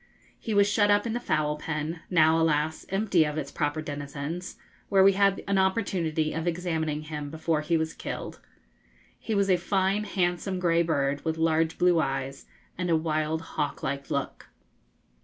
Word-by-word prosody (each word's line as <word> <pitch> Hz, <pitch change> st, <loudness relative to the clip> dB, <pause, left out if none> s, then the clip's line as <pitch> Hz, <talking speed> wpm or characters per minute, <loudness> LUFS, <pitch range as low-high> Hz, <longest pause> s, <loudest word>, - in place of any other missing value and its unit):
He 220 Hz, -, -3 dB
was 200 Hz, 0 st, +5 dB
shut 205 Hz, 0 st, +3 dB
up 205 Hz, +1 st, +3 dB
in 230 Hz, -, -2 dB
the 240 Hz, -, -1 dB
fowl 155 Hz, -8 st, 0 dB
pen 160 Hz, +2 st, -4 dB
now, 160 Hz, -2 st, +4 dB
alas, 155 Hz, 0 st, 0 dB
empty 195 Hz, -4 st, +2 dB
of 150 Hz, 0 st, -3 dB
its 140 Hz, -2 st, -4 dB
proper 150 Hz, 0 st, -1 dB
denizens 145 Hz, +4 st, -5 dB, 0.3 s
where 195 Hz, -1 st, +5 dB
we 195 Hz, 0 st, +6 dB
had 195 Hz, 0 st, +2 dB
an 200 Hz, -1 st, +2 dB
opportunity 180 Hz, -6 st, 0 dB
of 160 Hz, +2 st, -3 dB
examining 160 Hz, -3 st, -1 dB
him 150 Hz, -2 st, -5 dB
before 160 Hz, 0 st, -1 dB
he 165 Hz, +2 st, +1 dB
was 160 Hz, 0 st, -2 dB
killed. -, -, -6 dB, 0.8 s
He 220 Hz, -, -3 dB
was 200 Hz, -1 st, +2 dB
a 185 Hz, -2 st, +4 dB
fine, 195 Hz, +3 st, 0 dB
handsome, 180 Hz, 0 st, -1 dB
grey 170 Hz, -2 st, +3 dB
bird, 145 Hz, -4 st, 0 dB
with 160 Hz, 0 st, -1 dB
large 160 Hz, 0 st, +1 dB
blue 175 Hz, -2 st, +4 dB
eyes, 135 Hz, -2 st, -3 dB, 0.3 s
and 180 Hz, -1 st, -1 dB
a 165 Hz, -, +4 dB
wild 155 Hz, 0 st, -1 dB
hawk 145 Hz, -2 st, -3 dB
like 140 Hz, 0 st, -3 dB
look. -, -, -3 dB
160 Hz, 175 wpm, -27 LUFS, 155-190 Hz, 0.8 s, we